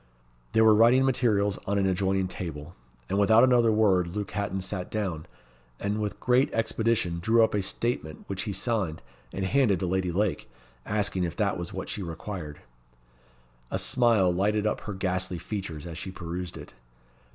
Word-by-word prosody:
There 110 Hz, -, +5 dB
were 110 Hz, -, +7 dB
writing 120 Hz, +5 st, +5 dB
materials 105 Hz, -6 st, +1 dB
on 100 Hz, +1 st, +1 dB
an 100 Hz, -, +2 dB
adjoining 95 Hz, 0 st, +1 dB
table, 80 Hz, -3 st, -6 dB, 0.3 s
and, 100 Hz, -, 0 dB
without 110 Hz, +3 st, +6 dB
another 120 Hz, -3 st, +5 dB
word, 100 Hz, -5 st, +3 dB
Luke 100 Hz, +3 st, -4 dB
Hatton 100 Hz, -2 st, -2 dB
sat 90 Hz, -1 st, -4 dB
down, 95 Hz, -8 st, -3 dB, 0.5 s
and 105 Hz, +1 st, -2 dB
with 105 Hz, -1 st, -3 dB
great 125 Hz, +2 st, +2 dB
expedition 110 Hz, -6 st, 0 dB
drew 115 Hz, +6 st, +4 dB
up 110 Hz, -, +1 dB
a 105 Hz, -, +1 dB
statement 95 Hz, -5 st, -3 dB
which 100 Hz, -1 st, -4 dB
he -, -, -1 dB
signed, 100 Hz, -5 st, -1 dB, 0.3 s
and 95 Hz, -, -3 dB
handed 110 Hz, -4 st, +2 dB
to -, -, 0 dB
Lady 90 Hz, 0 st, 0 dB
Lake; 100 Hz, -4 st, -1 dB, 0.4 s
asking 105 Hz, -3 st, 0 dB
if 85 Hz, -, -3 dB
that 100 Hz, -3 st, 0 dB
was 85 Hz, +1 st, -5 dB
what 95 Hz, -1 st, -5 dB
she 105 Hz, -, -4 dB
required? 85 Hz, -2 st, -6 dB, 1.1 s
A -, -, -1 dB
smile 115 Hz, -8 st, +3 dB
lighted 105 Hz, +3 st, +1 dB
up 105 Hz, -, 0 dB
her 105 Hz, -, -6 dB
ghastly 95 Hz, -1 st, -1 dB
features 85 Hz, -5 st, -5 dB
as 85 Hz, -1 st, -7 dB
she -, -, -5 dB
perused 90 Hz, -1 st, -6 dB
it. 75 Hz, -3 st, -11 dB
100 Hz, 175 wpm, -27 LUFS, 90-110 Hz, 1.1 s, were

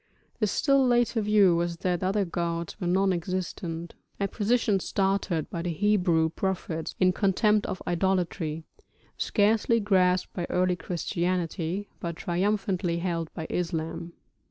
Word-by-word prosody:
The 215 Hz, -, +2 dB
still 275 Hz, +6 st, +3 dB
later 240 Hz, -2 st, +2 dB
view 205 Hz, -4 st, +4 dB
was 170 Hz, 0 st, -1 dB
that 175 Hz, 0 st, -1 dB
other 195 Hz, +2 st, +1 dB
gods 170 Hz, +1 st, -3 dB
were 175 Hz, -, -1 dB
non 190 Hz, +2 st, +3 dB
existent, 175 Hz, -2 st, -4 dB, 0.3 s
a 200 Hz, -, +1 dB
position 215 Hz, -1 st, +1 dB
started 195 Hz, -4 st, 0 dB
by 170 Hz, -, -3 dB
the 175 Hz, -, -2 dB
Hebrew 180 Hz, -3 st, +2 dB
prophets 170 Hz, -2 st, -3 dB
in 185 Hz, -1 st, +4 dB
contempt 210 Hz, +2 st, +2 dB
of 190 Hz, -3 st, -5 dB
idolatry, 175 Hz, -3 st, -1 dB, 0.5 s
scarcely 220 Hz, +2 st, +2 dB
grasped 185 Hz, -3 st, +2 dB
by 175 Hz, -2 st, -3 dB
early 180 Hz, 0 st, +2 dB
Christianity, 175 Hz, +2 st, -2 dB
but 170 Hz, -1 st, -4 dB
triumphantly 185 Hz, 0 st, 0 dB
held 170 Hz, -2 st, -2 dB
by 160 Hz, -, -4 dB
Islam. 165 Hz, 0 st, -3 dB
185 Hz, 130 wpm, -27 LUFS, 170-205 Hz, 0.5 s, view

